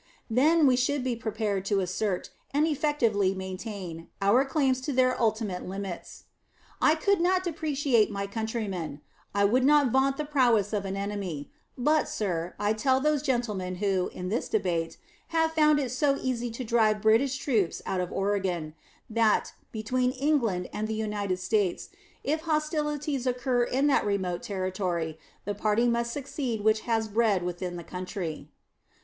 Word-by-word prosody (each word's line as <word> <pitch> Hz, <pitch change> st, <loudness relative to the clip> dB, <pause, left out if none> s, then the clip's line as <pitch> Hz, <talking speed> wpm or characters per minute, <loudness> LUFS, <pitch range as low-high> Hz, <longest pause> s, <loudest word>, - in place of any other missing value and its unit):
Then 305 Hz, +7 st, +4 dB
we 260 Hz, -2 st, +5 dB
should 255 Hz, +2 st, +1 dB
be 255 Hz, -2 st, 0 dB
prepared 215 Hz, -3 st, -2 dB
to 200 Hz, 0 st, +1 dB
assert, 185 Hz, +1 st, -2 dB, 0.2 s
and 300 Hz, +2 st, +4 dB
effectively 245 Hz, -11 st, +1 dB
maintain, 190 Hz, -3 st, -6 dB
our 205 Hz, +7 st, +4 dB
claims 270 Hz, -2 st, +1 dB
to 285 Hz, -, -3 dB
their 255 Hz, -1 st, +3 dB
ultimate 215 Hz, -5 st, 0 dB
limits. 195 Hz, -1 st, -6 dB, 0.6 s
I 310 Hz, -, +5 dB
could 390 Hz, +3 st, +2 dB
not 365 Hz, +1 st, +2 dB
depreciate 290 Hz, -, +1 dB
my 200 Hz, -2 st, -3 dB
countrymen; 200 Hz, -8 st, -4 dB, 0.3 s
I 200 Hz, 0 st, +4 dB
would 250 Hz, +6 st, +3 dB
not 285 Hz, -2 st, +5 dB
vaunt 270 Hz, +2 st, +2 dB
the 300 Hz, -, -2 dB
prowess 240 Hz, -8 st, +2 dB
of 205 Hz, -2 st, -1 dB
an 195 Hz, 0 st, -3 dB
enemy; 195 Hz, -7 st, -4 dB, 0.3 s
but, 300 Hz, +5 st, +2 dB
sir, 175 Hz, -4 st, -2 dB
I 205 Hz, +1 st, +1 dB
tell 260 Hz, +4 st, +2 dB
those 300 Hz, 0 st, +1 dB
gentlemen 220 Hz, -10 st, -1 dB
who, 190 Hz, -1 st, 0 dB
in 180 Hz, 0 st, -5 dB
this 225 Hz, +5 st, -2 dB
debate, 170 Hz, -6 st, -1 dB, 0.3 s
have 325 Hz, -1 st, +1 dB
found 305 Hz, -2 st, +4 dB
it 260 Hz, -4 st, -2 dB
so 275 Hz, +2 st, +2 dB
easy 245 Hz, -2 st, -2 dB
to 235 Hz, +3 st, -5 dB
drive 220 Hz, -2 st, +2 dB
British 235 Hz, +5 st, +3 dB
troops 225 Hz, -, 0 dB
out 190 Hz, -1 st, -1 dB
of 180 Hz, -, -4 dB
Oregon, 190 Hz, -6 st, -1 dB, 0.3 s
that, 225 Hz, -1 st, +2 dB, 0.2 s
between 250 Hz, +3 st, 0 dB
England 255 Hz, -10 st, +1 dB
and 215 Hz, +1 st, -2 dB
the 220 Hz, -, -2 dB
United 210 Hz, -3 st, -2 dB
States, 185 Hz, 0 st, 0 dB, 0.3 s
if 310 Hz, +2 st, 0 dB
hostilities 300 Hz, -4 st, -1 dB
occur 245 Hz, -1 st, +1 dB
in 265 Hz, +3 st, +1 dB
that 290 Hz, -, +3 dB
remote 185 Hz, -4 st, -1 dB
territory, 185 Hz, -5 st, -2 dB, 0.3 s
the 205 Hz, -, -1 dB
party 215 Hz, +3 st, +1 dB
must 235 Hz, 0 st, 0 dB
succeed 270 Hz, -4 st, -3 dB
which 215 Hz, +1 st, +3 dB
has 225 Hz, -1 st, +1 dB
bread 215 Hz, -3 st, +2 dB
within 175 Hz, 0 st, -4 dB
the 170 Hz, -, -6 dB
country.... 180 Hz, -3 st, -5 dB
220 Hz, 160 wpm, -28 LUFS, 195-270 Hz, 0.6 s, we